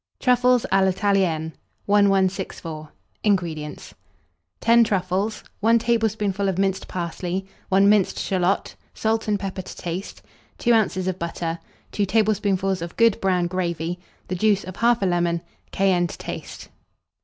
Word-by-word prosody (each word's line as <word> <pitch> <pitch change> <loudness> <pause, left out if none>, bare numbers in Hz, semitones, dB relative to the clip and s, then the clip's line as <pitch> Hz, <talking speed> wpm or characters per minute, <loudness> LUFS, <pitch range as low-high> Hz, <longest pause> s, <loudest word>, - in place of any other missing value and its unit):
TRUFFLES 250 -1 +3
A 195 0 +4
L'ITALIENNE. 185 -5 +1 0.3
1164. 190 -6 +1 0.3
INGREDIENTS. 165 -7 -2 0.7
10 235 +1 +5
truffles, 195 +1 -1 0.2
1 230 +2 +4
tablespoonful 215 -4 0
of 185 - -2
minced 195 0 0
parsley, 180 +1 -3 0.2
1 195 +1 +4
minced 205 -2 +3
shalot, 185 0 0 0.2
salt 220 0 0
and 205 -1 +1
pepper 190 -1 -4
to - - -10
taste, 175 +2 -6 0.3
2 240 - +2
oz. 220 -4 +2
of 185 -1 -2
butter, 165 0 -3 0.3
2 205 -1 0
tablespoonfuls 200 -3 +1
of 170 0 -7
good 230 -2 +4
brown 185 -2 +2
gravy, 175 -1 -2 0.3
the - - -3
juice 200 +2 +2
of 185 - -7
1/2 235 -4 +3
lemon, 175 -1 +1 0.3
cayenne 185 -2 +2
to - - -9
taste. - - -8
190 Hz, 130 wpm, -23 LUFS, 175-210 Hz, 0.7 s, 10